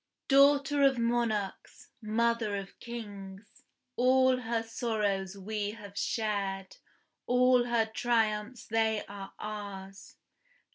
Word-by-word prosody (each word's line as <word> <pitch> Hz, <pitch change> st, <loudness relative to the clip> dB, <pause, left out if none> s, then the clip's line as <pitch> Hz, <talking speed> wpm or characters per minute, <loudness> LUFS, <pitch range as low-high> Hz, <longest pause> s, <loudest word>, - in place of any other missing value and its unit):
Daughter 280 Hz, +1 st, +5 dB
of 270 Hz, -2 st, +5 dB
monarchs, 230 Hz, -4 st, -2 dB
mother 225 Hz, -1 st, +1 dB
of 195 Hz, -1 st, -7 dB
kings; 205 Hz, -4 st, -9 dB, 0.3 s
All 260 Hz, +1 st, +4 dB
her 230 Hz, -2 st, -2 dB
sorrows 210 Hz, -4 st, -2 dB
we 205 Hz, +1 st, -3 dB
have 205 Hz, -3 st, -11 dB
shared, 200 Hz, -3 st, -2 dB, 0.5 s
All 250 Hz, 0 st, +4 dB
her 235 Hz, -2 st, +2 dB
triumphs 220 Hz, 0 st, 0 dB
they 220 Hz, -1 st, +1 dB
are 195 Hz, -1 st, -9 dB
ours. 200 Hz, -2 st, -7 dB
220 Hz, 100 wpm, -30 LUFS, 200-240 Hz, 0.5 s, Daughter